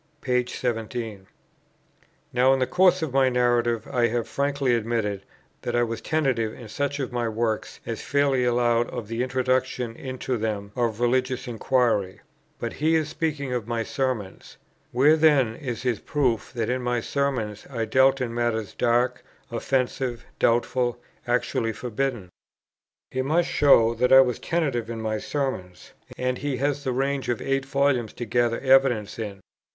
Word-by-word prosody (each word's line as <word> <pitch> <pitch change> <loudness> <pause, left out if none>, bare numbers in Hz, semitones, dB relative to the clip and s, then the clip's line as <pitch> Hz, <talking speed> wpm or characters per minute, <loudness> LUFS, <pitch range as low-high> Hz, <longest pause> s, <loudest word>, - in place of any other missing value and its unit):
p. 125 -3 +1
17. 115 -4 -4 1.1
Now, 125 +2 +4
in - - +2
the 130 - +2
course 180 +2 +3
of 150 -5 -3
my 135 -1 +4
Narrative, 120 -2 +1
I 120 -1 +2
have 120 0 -2
frankly 140 -2 0
admitted 110 -3 -1 0.4
that - - -3
I 120 - +3
was 115 -1 -3
tentative 130 -8 0
in 120 - -10
such 145 +4 -2
of 130 -2 -3
my 120 -1 -1
works 110 0 -2
as 115 - -4
fairly 140 -2 +1
allowed 120 -1 +2
of 120 -4 -6
the 115 +2 -3
introduction 130 -2 0
into 130 -1 -4
them 105 -2 -3
of 115 -3 -1
religious 130 +1 0
inquiry; 115 -5 +1 0.4
but 115 - -4
he 160 +2 +1
is 155 -2 +1
speaking 150 -5 -2
of 120 -3 -3
my 115 -1 -1
Sermons; 125 -7 -3 0.3
where, 140 +6 +5
then, 145 -8 +4
is 120 -4 -5
his 125 -4 0
proof 130 -8 -1
that 115 -3 -2
in 125 +1 -1
my 125 -1 0
Sermons 120 -5 -2
I 115 -4 -2
dealt 130 +4 +4
in 120 -2 -2
matters 115 -3 -1
dark, 120 +1 +1 0.3
offensive, 125 0 -1
doubtful, 120 +1 +1 0.3
actually 120 -1 0
forbidden? 120 -4 -3 0.8
He 130 - -1
must 160 +6 +1
show 115 -6 +5
that 125 +2 +1
I 135 0 +10
was 125 -3 0
tentative 135 -9 -1
in 115 -1 -4
my 110 -1 -2
Sermons; 120 -13 -4 0.3
and 125 0 -1
he 140 -2 -2
has 145 +2 -1
the 130 - -1
range 135 +1 -1
of 120 - 0
eight 135 0 -1
volumes 135 -5 +1
to 120 - -5
gather 115 +1 +1
evidence 130 -6 +3
in. 100 -3 -5
125 Hz, 160 wpm, -25 LUFS, 115-135 Hz, 1.1 s, I